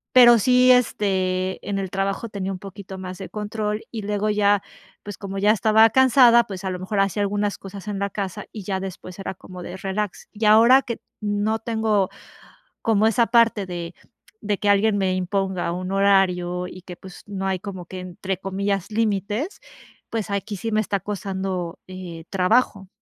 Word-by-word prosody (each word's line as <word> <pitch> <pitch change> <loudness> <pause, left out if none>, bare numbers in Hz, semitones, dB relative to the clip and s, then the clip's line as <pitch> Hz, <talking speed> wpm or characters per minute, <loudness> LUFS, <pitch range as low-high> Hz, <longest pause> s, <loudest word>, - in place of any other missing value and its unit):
pero 240 -2 +9
sí, 250 +3 +5
este, 190 -6 +1
en 200 -1 -1
el 190 -1 -3
trabajo 195 +3 -2
tenía 195 -2 -4
un 185 - -7
poquito 195 0 -9
más 185 0 -7
de 190 - -7
control 210 0 -3
y 220 -3 -5
luego 205 +1 -1
ya, 205 -1 +3 0.4
pues, 205 -1 -7
como 195 -1 -5
ya 205 +2 +3
estaba 220 +1 +5
cansada, 245 -2 +6
pues 195 -3 -7
a - - 0
lo 180 - -3
mejor 195 +3 -2
hacía 195 +1 0
algunas 205 0 -1
cosas 195 +1 -10
en 205 - -3
la 200 0 -1
casa 200 0 -4
y 215 - -8
ya 190 0 -2
después 185 -1 -8
era 195 - -4
como 180 0 -10
de 175 - -7
relax. 195 +1 -4
Y 215 0 -2
ahora 230 +5 +7
que 235 - -5 0.2
no 210 +1 0
tengo 220 -4 0 0.7
como 220 -2 +3
esa 230 +1 +3
parte 230 -3 +4
de 175 -1 -6 0.5
de 205 -2 -1
que 205 - -1
alguien 205 +1 +3
me 190 -1 +1
imponga 185 -1 -1
un 185 +1 -4
horario 180 -3 +2
y 185 - -11
que, 180 -1 -9
pues, 190 +1 -12
no 195 -2 -4
hay 190 -1 0
como 185 -3 -7
que 185 +1 -7
entre 185 +1 -4
comillas 195 0 -2
límites, 215 - -1 0.5
pues 225 -3 -3
aquí 200 +1 -3
sí 225 +4 -4
me 215 - +3
está 200 -1 -2
costando, 190 -3 -4
eh, 180 -3 -8
trabajo. 195 +1 +1
200 Hz, 185 wpm, -23 LUFS, 190-215 Hz, 0.7 s, pero